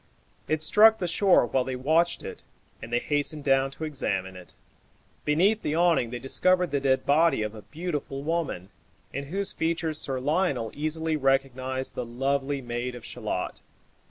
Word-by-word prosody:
It 155 0 0
struck 220 +5 +6
the 180 - -2
shore 180 -3 +4
while 130 +1 0
they 130 0 -4
watched 160 +6 +1
it, - - -8 0.4
and 115 - -8
they 120 - +2
hastened 145 +3 -1
down 135 -1 +3
to 140 +3 -9
examine 95 -11 -2
it. 90 -1 -13 0.7
Beneath 190 +9 +3
the 150 - -1
awning 170 -8 +3
they 125 - -4
discovered 180 +8 +2
the 140 - +1
dead 135 -1 +1
body 155 -5 +3
of 105 0 -4
a 110 - -10
beautiful 150 - -5
woman, 155 - -2 0.4
in 140 +1 -4
whose 195 +7 -1
features 160 -1 -1
Sir 135 -2 -2
Lionel 145 - 0
easily 160 +1 -2
recognized 130 -1 0
the - - -3
lovely 135 +3 -1
maid 120 +1 -4
of 120 -1 -10
Shalott. 110 -7 -4
140 Hz, 165 wpm, -27 LUFS, 125-160 Hz, 0.7 s, struck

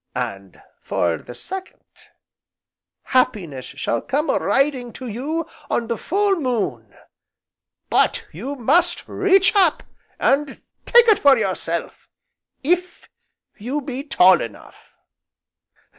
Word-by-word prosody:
And, 95 -1 -5 0.2
for 85 -2 -1
the 120 - -11
second, 380 0 -8 1.2
Happiness 195 - 0
shall 115 - -3
come 295 +4 -1
a - - +1
riding 270 -3 0
to 260 - -8
you 285 +9 -3 0.2
on 235 - 0
the 235 0 -2
full 395 +1 +1
moon, 200 - -3 0.9
but - - +1
you 250 - -6
must 335 +8 +1
reach 390 +1 +3
up 365 -6 +3 0.4
and 275 0 +1 0.3
take 475 -1 +6
it 430 -3 +5
for 280 -2 +6
yourself, 185 -5 -3 0.5
if 360 +4 -1 0.5
you 255 +8 -3
be 270 -1 -6
tall 185 - +5
enough." 115 -3 -10
265 Hz, 115 wpm, -21 LUFS, -, 1.2 s, take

